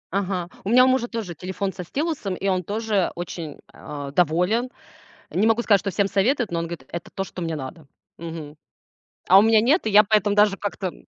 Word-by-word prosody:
Ага, 185 -3 -1 0.2
у 195 - -3
меня 255 +3 +6
у - - +3
мужа 260 -2 +2
тоже 225 -7 -5
телефон 185 +3 -4
со 180 - -7
стилусом, 275 - -3
и 195 - -3
он 185 -1 +1
тоже 210 0 -1
очень, 170 -3 -6 0.2
а, 145 -2 -7
доволен. 180 - +1 0.6
Не 200 - +1
могу 225 +1 +3
сказать, 205 -5 +3
что 200 - -2
всем 200 +2 +1
советует, 220 +3 +1
но 170 - -1
он 165 - -3
говорит: 165 -5 -8
"Это 170 0 -7
то, 195 - -3
что 185 - -9
мне 165 -2 -2
надо". 145 +3 -8 0.3
Мгм. 160 -3 -8 0.7
А 190 - +8
у - - +7
меня 220 0 +5
нет, 275 - +2
и - - +1
я 210 +1 +7
поэтому 205 -1 +2
даже 205 -1 +4
как-то, 205 -1 -4
м, 180 - -8
195 Hz, 215 wpm, -23 LUFS, 170-220 Hz, 0.7 s, А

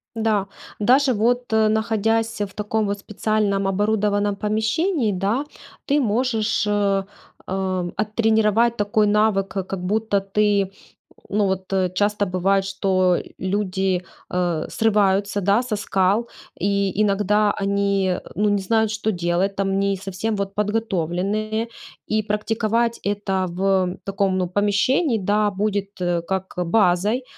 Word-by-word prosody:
Да, 215 -3 0 0.3
даже, 255 +5 +4
вот, 240 +2 0
э, 220 0 +4
находясь 225 0 0
в 200 -2 -3
таком, 210 +1 -1
вот, 200 0 -2
специальном, 205 -1 -1
оборудованном 205 0 +1
помещении, 220 - 0
да, 205 +9 -1 0.4
ты 285 +1 +2
можешь, 225 -2 0
э, 200 -1 +1 0.4
оттренировать 215 +5 +1
такой 210 +1 +2
навык, 205 -2 +2
как 190 -1 -4
как 190 -2 -5
будто 210 +2 +1
ты, 200 0 +1 0.6
ну, 210 0 +1
вот, 190 0 -3
э, 185 -1 +2
часто 205 +1 +1
бывает, 195 +1 +1
что 185 -2 +1 0.2
люди, 190 -1 -1 0.3
э, 175 -3 -1
срываются, 205 -2 +1
да, 200 +5 +2
со 245 -4 -2
скал 205 +2 +1 0.3
и 200 0 0
иногда 210 0 +2
они, 200 -2 0 0.2
ну, 210 +1 +2
не 205 -1 +1
знают, 220 +2 +1
что 215 0 -1
делать, 175 +2 0
там, 195 0 0
не 200 0 +1
совсем, 195 +3 -3
вот, 200 -1 -3
подготовленные. 210 +1 -1 0.4
И 215 0 +1
практиковать 225 +2 0
это 195 -2 -1
в 185 0 0
таком, 195 -1 0
ну, 180 - 0
помещении, 210 - +2
да, 205 +1 +1
будет, 200 0 -1
э, 175 -1 0
как 190 +2 -4
базой 190 +5 +2
205 Hz, 130 wpm, -22 LUFS, 195-215 Hz, 0.6 s, даже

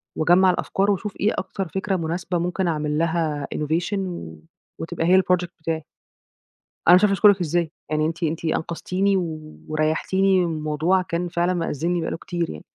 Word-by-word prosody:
وأجَمّع 175 +4 +4
الأفكار 195 +2 +1
وأشوف 200 +1 -2
إيه 210 +3 +2
أكتر 195 0 -3
فكرة 195 +3 -2
مناسبة 175 +1 -2
ممكن 180 +2 -1
أعمل 150 -2 -1
لها 160 -3 0
innovation 170 +6 -1 0.8
وتبقى 165 0 -3
هي 185 +2 +6
الproject 180 -1 +1
بتاعي. 160 -1 -2 1.0
أنا 175 - +9
مش 180 - +6
عارفة 200 - +4
أشكرِك 200 0 +5
إزاي. 170 -1 0 0.2
يعني 155 0 +1
أنتِ 165 +2 -4
أنتِ 160 +1 -1
أنقذتيني 180 +4 0 0.5
وريحتيني 175 +5 +2
من 160 -2 -3
موضوع 160 +5 +1
كان 175 0 -3
فعلًا 175 +1 0
مأزّمني 170 0 -1
بقى 165 - -3
له - - -3
كتير 175 -1 -3
يعني. 75 - -9
175 Hz, 160 wpm, -23 LUFS, 160-185 Hz, 1.0 s, أنا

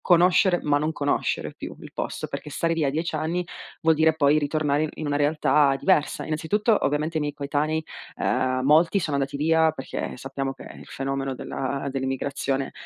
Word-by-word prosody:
Conoscere 180 +1 +4
ma 145 -1 +2
non 155 +2 0
conoscere 145 -2 -1
più - - -8
il - - -11
posto, - - -4
perchè - - -6
stare 165 +3 0
via 155 -4 +1
10 160 +4 -2
anni 165 +3 -1 0.4
vuol 160 0 +5
dire 160 0 +3
poi 150 -1 +4
ritornare 150 0 0
in 155 - -2
in 155 - -5
una 145 -1 -1
realtà 145 -1 +3
diversa. 170 -6 +1
Innanzitutto, 195 +8 +1
ovviamente, 150 +3 0
i - - +1
miei 145 -1 -2
coetanei, 150 +2 -1 0.3
uhm, 130 0 0
molti 160 +7 +4
sono 155 -5 -1
andati 140 +1 -2
via 160 +2 +3
perché 135 -4 -5
sappiamo 135 +1 -4
che - - -13
il - - -12
fenomeno 135 0 -3
della 135 +2 -4
dell'immigrazione 135 0 -2
150 Hz, 175 wpm, -25 LUFS, 140-160 Hz, 0.4 s, vuol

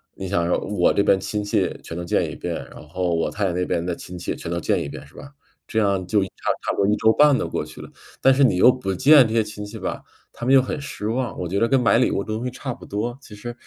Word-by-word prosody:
你 95 - -6
想 85 -3 0
说， - - +2
我 100 -4 +1
这 - - +2
边 100 - +4
亲 100 +2 -3
戚 105 - 0
全 80 - -8
都 85 - -4
见 85 - 0
一 - - -7
遍， - - -4 0.2
然 - - -12
后 90 0 -1
我 80 - -1
太 100 -1 -2
太 90 - 0
那 90 +1 -1
边 85 -1 -1
的 90 - -2
亲 90 +1 -9
戚 - - -3
全 85 - -7
都 85 - -1
见 - - 0
一 - - -6
遍， - - -9
是 - - -22
吧？ 140 - -11 0.4
这 110 - 0
样 100 -3 +1
就 100 +3 +2
差 - - -4 0.4
差 - - +1
不 - - -5
多 100 - +2
1 105 - +3
周 110 0 +4
半 145 -1 +5
都 - - -2
过 - - -3
去 75 0 -12
了。 - - -10 0.3
但 135 - +5
是 140 +2 +3
你 120 -9 +3
又 95 - +7
不 125 -7 -1
见 140 - +7
这 110 - -3
些 115 - +3
亲 105 -1 -6
戚 110 +2 -9
吧， - - -4 0.3
他 120 - -7
们 130 - +3
又 135 - +7
很 130 - -4
失 105 -6 -6
望， 120 -2 -2
我 90 - -3
觉 100 +3 -1
得 115 - +3
跟 135 - +4
买 115 -1 +4
礼 125 - +2
物 100 - -1
东 110 +2 -4
西 125 - -3
差 130 0 -5
不 - - -13
多。 115 +5 -3
其 110 - -14
实 120 +4 -7
105 Hz, 325 characters per minute, -22 LUFS, 90-120 Hz, 0.4 s, 又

